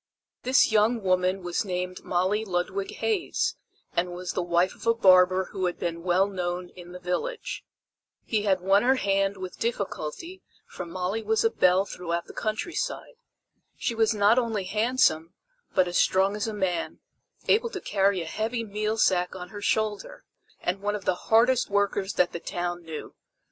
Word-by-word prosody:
This 255 Hz, -1 st, +4 dB
young 220 Hz, +1 st, +3 dB
woman 185 Hz, 0 st, +1 dB
was 175 Hz, +3 st, -1 dB
named 180 Hz, -2 st, -4 dB
Molly 185 Hz, +4 st, 0 dB
Ludwig 300 Hz, -, -2 dB
Hays, 445 Hz, +2 st, -1 dB, 0.4 s
and 175 Hz, +1 st, 0 dB
was 180 Hz, 0 st, -4 dB
the -, -, -1 dB
wife 175 Hz, +1 st, +1 dB
of -, -, -10 dB
a 230 Hz, -, +4 dB
barber 185 Hz, -3 st, +5 dB
who 190 Hz, -2 st, -1 dB
had 175 Hz, -, -3 dB
been 170 Hz, -1 st, -3 dB
well 180 Hz, +2 st, +3 dB
known 180 Hz, -2 st, -3 dB
in 175 Hz, -1 st, -12 dB
the 180 Hz, -, -8 dB
village. 180 Hz, -, -3 dB, 0.6 s
He 215 Hz, -2 st, 0 dB
had 195 Hz, -3 st, +1 dB
won 195 Hz, +2 st, +4 dB
her 260 Hz, +2 st, +4 dB
hand 195 Hz, -3 st, +1 dB
with 185 Hz, -1 st, -7 dB
difficulty 235 Hz, -, -4 dB, 0.2 s
for 180 Hz, -, -8 dB
Molly 185 Hz, +5 st, -2 dB
was 220 Hz, +1 st, +1 dB
a 225 Hz, -, +3 dB
belle 185 Hz, -1 st, +3 dB
throughout 170 Hz, -3 st, -4 dB
the -, -, -12 dB
countryside. 340 Hz, -, -3 dB, 0.6 s
She -, -, -1 dB
was 225 Hz, -1 st, +2 dB
not 210 Hz, +2 st, +4 dB
only 225 Hz, -5 st, -1 dB
handsome, 205 Hz, -5 st, +1 dB, 0.4 s
but 185 Hz, -, +4 dB
as 175 Hz, -, 0 dB
strong 190 Hz, +2 st, +3 dB
as 210 Hz, +1 st, -2 dB
a -, -, -2 dB
man, 190 Hz, -4 st, -2 dB, 0.5 s
able 460 Hz, +2 st, +3 dB
to 390 Hz, -, -5 dB
carry 195 Hz, -, +1 dB
a -, -, -5 dB
heavy 225 Hz, +7 st, -2 dB
meal 215 Hz, +1 st, -2 dB
sack 180 Hz, -4 st, +2 dB
on 180 Hz, -1 st, -7 dB
her 205 Hz, +1 st, -8 dB
shoulder; 220 Hz, -, -1 dB, 0.4 s
and 185 Hz, +2 st, -2 dB
one 205 Hz, +1 st, -1 dB
of 200 Hz, -3 st, -7 dB
the -, -, +3 dB, 0.2 s
hardest 235 Hz, +3 st, +4 dB
workers 200 Hz, -1 st, 0 dB
that 180 Hz, -, +2 dB
the 170 Hz, -, -5 dB
town 175 Hz, +1 st, -3 dB
knew. 160 Hz, -2 st, -8 dB
195 Hz, 175 wpm, -26 LUFS, 180-220 Hz, 0.6 s, barber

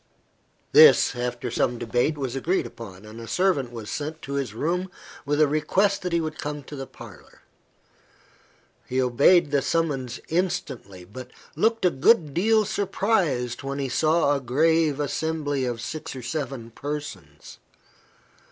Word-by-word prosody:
This, 460 Hz, -, +7 dB
after 120 Hz, 0 st, -3 dB
some 120 Hz, -, 0 dB
debate, 120 Hz, +7 st, 0 dB
was 135 Hz, -3 st, -3 dB
agreed 170 Hz, +8 st, 0 dB
upon, 100 Hz, -4 st, -10 dB
and 110 Hz, +2 st, -10 dB
a 115 Hz, -, -9 dB
servant 175 Hz, -9 st, +1 dB
was 115 Hz, -3 st, -7 dB
sent 155 Hz, +2 st, -4 dB
to 140 Hz, -, -6 dB
his 140 Hz, -4 st, -2 dB
room 180 Hz, +8 st, -1 dB, 0.4 s
with 145 Hz, +1 st, +1 dB
a 155 Hz, -, +5 dB
request 185 Hz, +7 st, +1 dB
that 180 Hz, -, -3 dB
he 170 Hz, -, +2 dB
would 155 Hz, -1 st, -4 dB
come 150 Hz, 0 st, -4 dB
to 145 Hz, -, -9 dB
the 135 Hz, -1 st, -6 dB
parlour. -, -, -14 dB, 1.4 s
He 130 Hz, -, -1 dB
obeyed 140 Hz, +6 st, +4 dB
the 140 Hz, -1 st, +2 dB
summons 135 Hz, -7 st, -1 dB
instantly, 155 Hz, -, -3 dB
but 125 Hz, +6 st, -10 dB, 0.3 s
looked 225 Hz, +6 st, +1 dB
a 180 Hz, -, +4 dB
good 150 Hz, -, +3 dB
deal 215 Hz, +5 st, +3 dB
surprised 190 Hz, -, 0 dB
when 140 Hz, 0 st, -4 dB
he 135 Hz, -2 st, -2 dB
saw 155 Hz, +2 st, +2 dB
a 140 Hz, -, -3 dB
grave 155 Hz, +3 st, +2 dB
assembly 145 Hz, -2 st, -1 dB
of 120 Hz, -2 st, -3 dB
six 155 Hz, +3 st, -6 dB
or 130 Hz, -, -7 dB
seven 130 Hz, -3 st, -4 dB
persons. 145 Hz, +4 st, -7 dB
145 Hz, 150 wpm, -25 LUFS, 125-165 Hz, 1.4 s, This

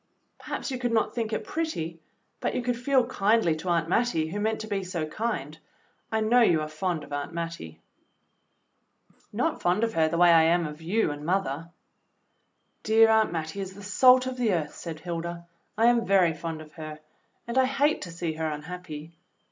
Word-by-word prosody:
"Perhaps -, -, -5 dB
you 255 Hz, -, -3 dB
could 245 Hz, -2 st, -1 dB
not 225 Hz, -1 st, +1 dB
think 230 Hz, -2 st, -2 dB
it -, -, -2 dB
pretty, 170 Hz, -, -3 dB, 0.4 s
but -, -, -2 dB
you 250 Hz, -, -1 dB
could 245 Hz, 0 st, 0 dB
feel 255 Hz, +1 st, +2 dB
kindly 215 Hz, -7 st, +2 dB
to 180 Hz, +3 st, -5 dB
Aunt 165 Hz, -2 st, +1 dB
Mattie, 170 Hz, -6 st, +1 dB
who 205 Hz, +5 st, -4 dB
meant 220 Hz, +1 st, 0 dB
to 220 Hz, -, -6 dB
be 200 Hz, -2 st, -2 dB
so 180 Hz, -4 st, -3 dB
kind. 155 Hz, -4 st, -4 dB, 0.5 s
I 220 Hz, 0 st, +1 dB
know 235 Hz, +3 st, +4 dB
you 170 Hz, -8 st, +4 dB
are 155 Hz, -, -3 dB
fond 155 Hz, +1 st, -2 dB
of 145 Hz, -, -10 dB
Aunt 145 Hz, +3 st, -4 dB
Mattie." 165 Hz, -, -5 dB, 1.3 s
THE -, -, -32 dB
PLAID -, -, -33 dB
DRESS -, -, -32 dB
39 -, -, +2 dB
"Not -, -, -15 dB
fond 180 Hz, +5 st, +2 dB
of 225 Hz, -1 st, 0 dB
her 160 Hz, -1 st, +2 dB
the 170 Hz, -, -1 dB
way 175 Hz, 0 st, +6 dB
I 165 Hz, -, +7 dB
am 170 Hz, +1 st, +3 dB
of 150 Hz, +1 st, -7 dB
you 180 Hz, +2 st, +1 dB
and 145 Hz, 0 st, -7 dB
mother." 165 Hz, -3 st, -1 dB, 1.1 s
"Dear 225 Hz, +1 st, +5 dB
Aunt 220 Hz, 0 st, +3 dB
Mattie 165 Hz, +3 st, -4 dB
is 190 Hz, -1 st, -6 dB
the 200 Hz, -, -11 dB
salt 255 Hz, +5 st, +5 dB
of 255 Hz, 0 st, -4 dB
the 230 Hz, -5 st, +1 dB
earth," 155 Hz, -4 st, -2 dB
said 160 Hz, -2 st, -7 dB
Hilda. 170 Hz, 0 st, -5 dB, 0.3 s
"I 225 Hz, -, +3 dB
am 240 Hz, -1 st, +4 dB
very 185 Hz, -4 st, +4 dB
fond 160 Hz, 0 st, -5 dB
of 155 Hz, -1 st, -13 dB
her, 155 Hz, -2 st, -7 dB, 0.5 s
and 235 Hz, +2 st, 0 dB
I 260 Hz, -, +5 dB
hate 280 Hz, +3 st, +1 dB
to 175 Hz, -, -6 dB
see 170 Hz, -1 st, -3 dB
her 160 Hz, 0 st, -2 dB
unhappy." 155 Hz, 0 st, -7 dB
180 Hz, 210 wpm, -27 LUFS, 160-225 Hz, 1.3 s, I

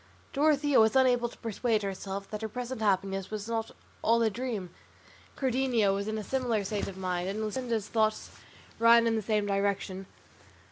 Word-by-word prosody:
Dorothea 290 Hz, -1 st, +3 dB
was 220 Hz, +3 st, +4 dB
unable 250 Hz, -2 st, +4 dB
to -, -, -15 dB
persuade 225 Hz, -1 st, -1 dB
herself 195 Hz, 0 st, -4 dB
that 210 Hz, 0 st, -4 dB
her 220 Hz, -, -3 dB
present 245 Hz, +1 st, -5 dB
happiness 195 Hz, -2 st, 0 dB
was 215 Hz, -1 st, -5 dB
not 225 Hz, -1 st, -2 dB, 0.3 s
all 230 Hz, +1 st, +3 dB
a 220 Hz, -, +2 dB
dream; 220 Hz, -6 st, -4 dB, 0.7 s
Cardenio 250 Hz, -6 st, +2 dB
was 200 Hz, +1 st, -2 dB
in 220 Hz, 0 st, -2 dB
a 215 Hz, -, -4 dB
similar 245 Hz, -4 st, 0 dB
state 205 Hz, +1 st, -2 dB
of 190 Hz, -, -7 dB
mind, 180 Hz, -1 st, -2 dB
and 205 Hz, +2 st, -3 dB
Luscinda's 225 Hz, -1 st, -2 dB
thoughts 220 Hz, -1 st, 0 dB, 0.5 s
ran 230 Hz, 0 st, +6 dB
in 230 Hz, -1 st, +2 dB
the 220 Hz, -, 0 dB
same 210 Hz, 0 st, 0 dB
direction. 195 Hz, -1 st, -1 dB
220 Hz, 175 wpm, -29 LUFS, 200-240 Hz, 0.7 s, ran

